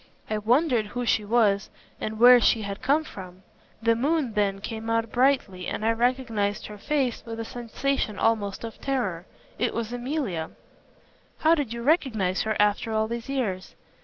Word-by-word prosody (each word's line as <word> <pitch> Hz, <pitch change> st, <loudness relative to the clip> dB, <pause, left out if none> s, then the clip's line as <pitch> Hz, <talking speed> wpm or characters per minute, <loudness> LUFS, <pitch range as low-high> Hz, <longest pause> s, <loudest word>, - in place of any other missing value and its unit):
I 215 Hz, -, 0 dB
wondered 240 Hz, 0 st, +2 dB
who 245 Hz, +4 st, -4 dB
she 225 Hz, -, +2 dB
was 205 Hz, -2 st, +2 dB, 0.3 s
and 215 Hz, 0 st, -4 dB
where 245 Hz, +2 st, +8 dB
she 225 Hz, -2 st, +3 dB
had 200 Hz, 0 st, -5 dB
come 290 Hz, +4 st, +2 dB
from. 185 Hz, -7 st, -10 dB, 0.4 s
The 230 Hz, 0 st, +4 dB
moon 275 Hz, 0 st, 0 dB
then 200 Hz, -2 st, 0 dB
came 225 Hz, +2 st, -5 dB
out 230 Hz, -1 st, 0 dB
brightly, 250 Hz, -8 st, +1 dB
and 215 Hz, -, -3 dB
I 225 Hz, -, +4 dB
recognized 230 Hz, -4 st, 0 dB
her 210 Hz, -1 st, -9 dB
face 270 Hz, -2 st, -1 dB
with 230 Hz, 0 st, -7 dB
a 225 Hz, -, -3 dB
sensation 240 Hz, -1 st, -2 dB
almost 210 Hz, -3 st, 0 dB
of 225 Hz, -1 st, -8 dB
terror. 200 Hz, -11 st, -2 dB, 0.3 s
It 240 Hz, +2 st, 0 dB
was 230 Hz, 0 st, -3 dB
Emilia." 245 Hz, -, -3 dB, 0.9 s
"How 320 Hz, +1 st, +5 dB
did 290 Hz, -8 st, -1 dB
you 235 Hz, 0 st, -5 dB
recognize 225 Hz, -, +1 dB
her 220 Hz, 0 st, -1 dB
after 210 Hz, +2 st, +2 dB
all 220 Hz, 0 st, +1 dB
these 235 Hz, +2 st, -5 dB
years?" 210 Hz, -9 st, -3 dB
230 Hz, 170 wpm, -26 LUFS, 205-250 Hz, 0.9 s, where